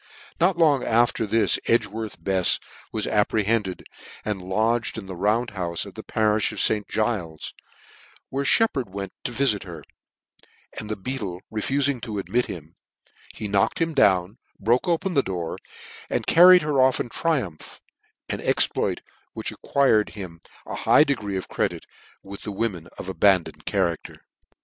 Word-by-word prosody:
'Not 175 +1 +3
long 150 -6 +4
alter 115 -1 +2
this 115 +2 +2
Edgworth 110 -1 0
Befs 95 -2 +2 0.3
was 110 -2 -2
appre 105 0 +1
hended, 105 -4 0 0.4
and 105 -3 -2
lodged 110 +6 0
in 110 - -6
the 95 -1 -7
Round 105 +6 +1
houfe 90 -4 -3
pf - - -10
the - - -8
pa^ifh 110 -1 +1
of 105 - -6
St. 105 -2 +1
Giles's, 100 -9 -2 0.8
where 135 +1 -2
Sheppard 140 - +2
went 100 -1 -6
to - - -2
viiit 120 -4 +1
her, 85 -5 -9 1.0
and 105 - -7
the 110 - -1
beadle 100 -4 -5
refufing 135 +4 0
to 110 -4 -5
admit 120 +5 0
him, 80 -1 -9 0.6
he 110 - -5
knocked 100 -1 +1
him 165 -1 0
down, 95 -5 +3 0.2
broke 120 - +2
open 175 +2 0
the 140 - +4
door, 90 -7 -4 0.5
and - - -1
carried 180 +1 +8
her 145 -3 +2
off 130 0 +3
in 120 - -3
triumph; 125 - -2 0.5
an - - -3
exploit - - +1 0.3
which - - -4
ac - - -12
quired 130 -7 +2
h'im 90 -5 -8 0.3
a - - -7
high - - +5
degree 105 -10 -2
of 95 - -5
credit - - -2 0.4
with 100 0 -9
the 105 - -5
wo 115 +4 0
men 85 -4 -10
of - - -7
abandoned 95 -2 +2
character. 85 -4 -1
105 Hz, 160 wpm, -24 LUFS, 95-130 Hz, 1.0 s, carried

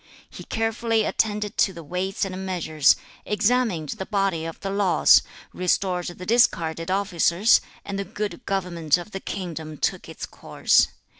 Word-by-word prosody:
6. - - -12
He - - -7
carefully 225 0 0
attended 210 -1 -1
to 195 - +3
the 170 - -9
weights 185 +6 -2
and 190 0 -5
measures, 160 -6 +2 0.3
examined 210 - +1
the 190 - -4
body 195 -6 0
of 165 - -7
the 195 - -3
laws, 200 -2 +5 0.3
restored 180 0 0
the 180 +1 -7
discarded 165 -7 +2
officers, 190 +1 +3 0.2
and 200 0 -4
the - - -1
good 200 -2 -5
government 175 -5 +1
of 175 +4 -9
the 195 - -5
kingdom 160 -6 -6
took - - -2
its - - -6
course. - - +2
190 Hz, 155 wpm, -24 LUFS, 170-205 Hz, 0.3 s, laws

